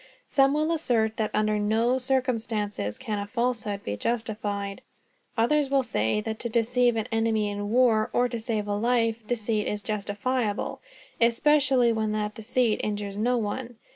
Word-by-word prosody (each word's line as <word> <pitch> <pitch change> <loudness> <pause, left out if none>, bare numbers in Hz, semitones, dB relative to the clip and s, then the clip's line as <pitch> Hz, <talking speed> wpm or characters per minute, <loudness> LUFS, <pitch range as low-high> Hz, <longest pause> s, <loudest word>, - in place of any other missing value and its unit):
Some 275 +1 +3
will 310 +2 +1
assert 230 -9 +1
that 215 -1 0
under 215 0 +1
no 225 +5 +2
circumstances 230 - -1
can 210 -2 -3
a 200 - -4
falsehood 230 -3 -2
be 100 - -3
justified. 205 - -3 0.6
Others 280 +5 +2
will 275 -1 +3
say 160 - 0
that 220 0 -4
to 235 - -3
deceive 240 +1 +2
an 220 0 -2
enemy 225 -2 +1
in 205 0 -4
war, 230 -2 +3
or 245 +1 +2
to 235 -1 -4
save 220 -2 -2
life, 230 +2 +1
deceit 220 -2 -1
is 210 0 -3
justifiable, 210 +2 -2 0.4
especially 260 0 +4
when 220 -1 -1
that 210 0 -2
deceit 220 +1 0
injures 205 -1 -3
no 245 +4 +1
one. 235 +3 -3
225 Hz, 155 wpm, -26 LUFS, 210-245 Hz, 0.6 s, especially